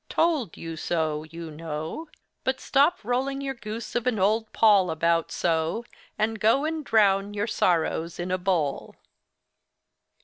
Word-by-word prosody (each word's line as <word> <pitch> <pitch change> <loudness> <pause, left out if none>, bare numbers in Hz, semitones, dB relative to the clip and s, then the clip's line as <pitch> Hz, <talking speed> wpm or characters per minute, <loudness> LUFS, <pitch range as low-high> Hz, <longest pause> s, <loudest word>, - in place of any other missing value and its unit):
Told 305 - +1
you 165 -1 -6
so, 155 -2 -1
you 165 0 -8
know—but 165 - -5
stop 290 +6 +3
rolling 260 +4 -1
your 275 -1 -3
goose 230 -2 -7
of 240 0 -1
an 245 -3 +1
old 215 +3 +1
poll 205 -5 +5
about 165 +1 +1
so, 165 +7 0 0.3
and 220 +1 0
go 230 +8 +3
and 315 -1 -2
drown 205 -3 +3
your 205 0 0
sorrows 170 -5 0
in 175 +1 -3
a 185 - 0
bowl! 175 -7 -1
200 Hz, 140 wpm, -26 LUFS, 165-240 Hz, 0.3 s, poll